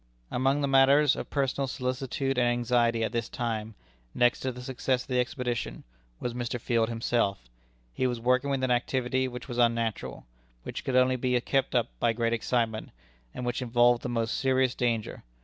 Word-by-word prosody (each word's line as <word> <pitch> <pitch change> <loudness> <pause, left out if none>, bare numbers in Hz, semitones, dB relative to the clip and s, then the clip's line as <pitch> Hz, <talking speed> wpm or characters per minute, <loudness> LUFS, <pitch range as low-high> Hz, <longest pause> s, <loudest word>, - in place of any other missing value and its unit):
Among 135 +3 +1
the 140 - +1
matters 135 +1 +5
of - - -6
personal 135 -1 0
solicitude 130 0 -2
and 120 - +3
anxiety 120 -1 +2
at 110 - -1
this 115 -2 -2
time 110 -2 -3 0.4
next 120 0 +3
to 130 - -2
the 125 0 -9
success 130 0 -1
of - - -22
the 125 -1 +1
expedition 125 - -2 0.4
was 120 - -3
Mr. 120 0 -3
Field 115 0 +1
himself. 115 - -1 0.5
He 130 - 0
was 120 -2 -2
working 125 +3 +2
with 135 -1 -1
an 130 - +1
activity 130 +1 0
which 125 0 -8
was 120 -2 -4
unnatural 115 - 0 0.4
which - - -6
could 130 - -2
only 130 0 +4
be 125 0 +1
kept 135 +1 0
up 120 -1 +2
by 115 -1 +2
great 115 0 0
excitement, 115 -1 -1 0.5
and 125 - -4
which 120 +2 -2
involved 120 0 +3
the 125 - -4
most 115 -1 -1
serious 130 -2 +2
danger. 115 -3 -2
125 Hz, 185 wpm, -28 LUFS, 115-130 Hz, 0.5 s, matters